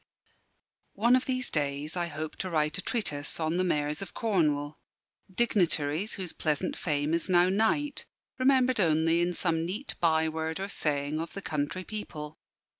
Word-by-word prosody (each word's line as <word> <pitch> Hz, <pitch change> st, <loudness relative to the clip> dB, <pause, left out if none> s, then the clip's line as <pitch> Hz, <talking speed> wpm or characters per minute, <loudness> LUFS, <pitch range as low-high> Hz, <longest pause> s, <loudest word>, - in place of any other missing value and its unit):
One 235 Hz, +5 st, +5 dB
of 255 Hz, -, +1 dB
these 255 Hz, -1 st, -1 dB
days 145 Hz, +1 st, -1 dB
I 175 Hz, -1 st, -1 dB
hope 155 Hz, 0 st, -5 dB
to 185 Hz, -, -3 dB
write 155 Hz, -1 st, +1 dB
a -, -, +1 dB
treatise 150 Hz, -, -2 dB
on 160 Hz, +1 st, 0 dB
the 185 Hz, -, +2 dB
Mayors 150 Hz, -3 st, 0 dB
of 195 Hz, -, -8 dB
Cornwall 150 Hz, -9 st, +1 dB, 0.5 s
dignitaries 180 Hz, -4 st, +1 dB
whose 185 Hz, -4 st, -5 dB
pleasant 155 Hz, +3 st, -1 dB
fame 150 Hz, -1 st, -1 dB
is 170 Hz, +2 st, -1 dB
now 180 Hz, 0 st, +5 dB
night, 225 Hz, +9 st, +1 dB, 0.3 s
remembered 255 Hz, -2 st, +4 dB
only 165 Hz, -1 st, +3 dB
in 175 Hz, 0 st, 0 dB
some 165 Hz, -2 st, +1 dB
neat 200 Hz, +11 st, -3 dB
by 160 Hz, -1 st, +3 dB
word 160 Hz, +1 st, -3 dB
or 195 Hz, +1 st, -3 dB
saying 145 Hz, -3 st, -1 dB
of 165 Hz, +1 st, -5 dB
the 195 Hz, -, -5 dB
country 150 Hz, +4 st, -2 dB
people. 160 Hz, -8 st, -7 dB
170 Hz, 165 wpm, -29 LUFS, 150-195 Hz, 0.5 s, One